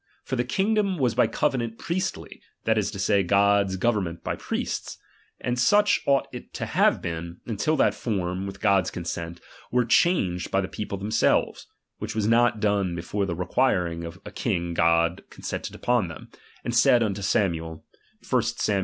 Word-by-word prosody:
For 130 - -3
the 120 - +1
king 190 - 0
dom 200 -4 +1
was 125 -6 +1
by - - +3
covenant 115 -2 -1
priestly, 180 +2 -4 0.2
that 110 - +2
is 105 -3 0
to - - -7
say, 100 +1 +2
God's 100 +1 +3
government 95 -5 -1
by - - -2
priests. - - -4 0.4
And 125 0 -2
such 205 +10 +4
ought, 140 -1 +3
it - - -9
to - - -3
have - - +2
been, 85 0 -5
until 115 +7 0
that 140 - +3
form, 95 -3 -2
with 100 0 -8
God's 100 -3 +3
consent, 85 -1 -5 0.3
were 125 0 +2
changed 100 - +2
by 95 - +1
the 95 - -3
people 100 0 -5
themselves; 105 +3 +1 0.3
which - - -5
was 110 -2 0
not 115 -1 +3
done 100 -4 +1
before 95 +4 -2
that 85 - -2
requiring 90 -3 0
a 85 +3 -9
king 85 -7 -2
God 85 +1 +2
consented - - -6
unto 120 -6 +3
them, 80 - -10 0.4
and 120 - -2
said 120 0 +5
unto 100 -2 -2
Samuel 80 -5 -1 0.2
( - - -24
1 - - +3
Sam. 100 -2 0
100 Hz, 175 wpm, -25 LUFS, 90-120 Hz, 0.4 s, said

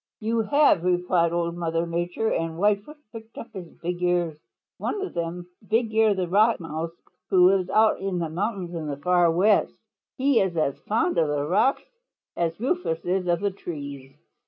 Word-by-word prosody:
"You 225 +1 -1
have," 250 - +3
replied 180 -1 +2
Old 170 0 -1
Mother 165 -1 -1
Nature, 175 +6 -1
and 165 0 -2
Whitefoot 205 - 0
pricked 225 0 -11
up - - -9
his 185 -4 -7 0.2
big 175 +1 -3
ears. 175 -3 +1 0.4
"One - - -2
of 390 - -5
them 170 +1 -4 0.2
Bigear 220 -2 +2
the 185 -2 -1
Rock 215 +6 +3
Mouse, 165 0 -4 0.4
who 180 -1 +5
lives 185 -1 +2
out 220 +2 +3
in 195 -2 -2
the 170 -1 -1
mountains 190 0 -3
of 160 -3 -4
the 140 -1 -4
Far 175 +3 +3
West. 195 +5 +3 0.4
He 270 -2 +3
is 185 -3 0
as 140 -3 0
fond 320 +12 +1
of 160 - +3
the 145 -1 -1
rocks 215 - +2 0.5
as 165 0 -2
Rufous 250 - -1
is 180 0 0
of 175 -1 +1
the 200 -1 0
trees. 140 -7 -8
180 Hz, 180 wpm, -25 LUFS, 170-215 Hz, 0.5 s, who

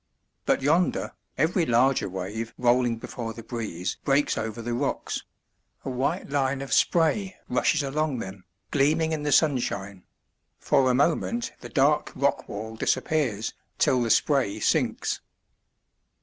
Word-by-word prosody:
But - - +2
yonder, 165 +5 +1 0.2
every 165 +5 +2
larger 125 -3 +2
wave 100 +5 -5
rolling 120 -1 +2
before 115 0 -6
the 115 - -9
breeze 110 -6 -4
breaks 140 +1 +2
over 110 +1 -4
the 120 +1 -3
rocks; 135 +4 -2 0.6
a 135 - -2
white 135 +8 -1
line 135 -1 0
of 135 - -4
spray 185 +3 +2
rushes 145 +4 +2
along 145 0 -1
them, 95 -3 -7 0.3
gleaming 155 +3 +2
in 155 -1 -1
the 145 0 -1
sunshine; 110 - +1 0.6
for 130 -1 +2
a 125 - +3
moment 170 - +1
the - - -9
dark 145 +1 +2
rock 140 0 0
wall 110 +2 -6
disappears, 115 -3 0 0.2
till 125 - +3
the 115 - 0
spray 120 -6 +2
sinks. - - 0
130 Hz, 135 wpm, -26 LUFS, 115-150 Hz, 0.6 s, a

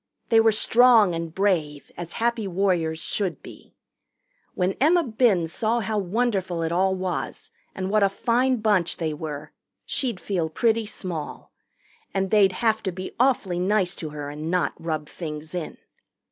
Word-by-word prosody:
They 225 - +6
were 225 0 +5
strong 225 -2 +5
and 165 -1 -4
brave, 160 -6 -1
as 170 -1 -7
Happy 235 -2 0
Warriors 175 -4 0
should 190 -5 -2
be. - - -14 0.8
When 185 +1 +1
Emma 335 +4 +5
Binns 215 - +1
saw 230 +1 0
how 215 -1 -1
wonderful 190 -4 -1
it 165 - -1
all 190 +2 +2
was 185 -1 -4 0.2
and 190 0 -3
what 215 0 +3
a 200 - +4
fine 245 +4 +1
bunch 205 -6 +2
they 160 -2 -2
were, 150 -1 -6 0.3
she'd 240 -8 -1
feel 175 -5 -2
pretty 225 +5 +1
small. 170 -7 -6 0.6
And 195 -1 0
they'd 200 -3 +5
have 220 0 +3
to 190 - -2
be 185 +1 -6
awfully 230 -9 +2
nice 190 0 +1
to 155 - -5
her 145 -1 -6
and 150 +2 -5
not 180 0 +1
rub 155 -2 -3
things 155 -1 -7
in. 175 -3 -5
190 Hz, 160 wpm, -24 LUFS, 165-220 Hz, 0.8 s, They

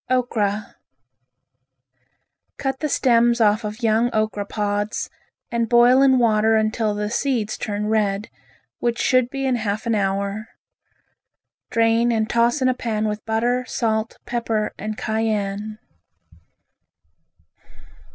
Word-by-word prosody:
Okra 215 -5 -1 1.8
Cut 270 -1 -2
the 305 - -2
stems 240 -3 +3
off 215 0 +3
of 215 +3 -6
young 225 +2 +3
okra 215 -2 -1
pods 205 0 -2 0.4
and 235 -1 0
boil 245 +2 +6
in 265 -1 +5
water 220 -2 +3
until 215 -1 0
the 210 0 -2
seeds 235 -4 -1
turn 210 0 -3
red, 210 -1 0 0.5
which 240 -1 0
should 255 -1 +2
be 270 +1 -3
in 255 -2 +1
half 215 -1 -3
an 230 - +1
hour. 200 +1 -1 1.2
Drain 230 +1 +2
and 220 -1 0
toss 235 +4 +2
in - - +3
a 255 - +3
pan 220 -3 -2
with 210 0 -4
butter, 240 +3 0
salt, 220 -1 -1
pepper 225 -3 -1
and 215 +1 -4
cayenne. 215 -1 -2
220 Hz, 120 wpm, -22 LUFS, 210-240 Hz, 1.8 s, boil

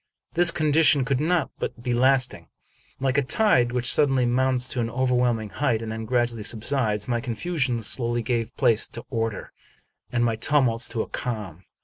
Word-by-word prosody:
This 175 +1 +6
condition 155 -3 +3
could 135 -1 0
not 165 +1 0 0.3
be 120 +1 -2
lasting. 130 +1 +1 0.5
Like 135 +1 +1
a - - +2
tide, 130 - +2
which 125 -1 +2
suddenly 135 -4 +2
mounts 125 +1 +1
to 125 - -3
an 115 -1 -1
overwhelming 125 -3 0
height 120 -1 0
and 110 - -5
then 110 0 -5
gradually 120 -1 0
subsides, 110 -1 -1
my 120 -2 -1
confusion 125 -1 -2
slowly 120 +2 -2
gave 115 -1 -3
place 115 -5 +2
to 115 - -10
order, 115 -3 -3 0.6
and 120 -1 +1
my 115 -1 0
tumults 125 -2 +1
to 115 - -2
a - - -11
calm. 105 -8 -6
125 Hz, 165 wpm, -24 LUFS, 115-135 Hz, 0.6 s, This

